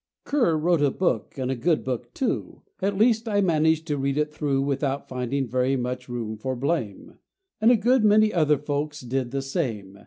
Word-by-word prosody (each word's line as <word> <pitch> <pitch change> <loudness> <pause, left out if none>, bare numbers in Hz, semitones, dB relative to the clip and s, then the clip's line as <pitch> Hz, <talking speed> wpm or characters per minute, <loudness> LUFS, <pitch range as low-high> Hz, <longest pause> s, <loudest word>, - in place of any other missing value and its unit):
Kerr 245 - +2
wrote 165 0 +2
a 145 - +4
book, 135 - -1
and 130 -1 -2
a - - -1
good 160 +6 +1
book, 125 -2 -4
too; 265 - -3 0.2
At 195 0 0
least 225 +1 +3
I[A] 205 -2 +1
managed 160 -2 +2
to 145 -2 -2
read 135 +1 -1
it 150 0 0
through 140 -3 0
Without 140 0 -2
finding 130 +2 -2
very 130 +3 +1
much 125 0 -4
room 115 -3 -4
for 130 +4 -3
blame, 125 - -3 0.4
And 220 +2 +5
a 245 - +7
good 240 +3 +3
many 215 0 +5
other 150 -3 +3
folks 150 +1 -3
did 125 0 -2
the 135 +2 -3
same. 110 - -4
140 Hz, 195 wpm, -25 LUFS, 125-170 Hz, 0.4 s, a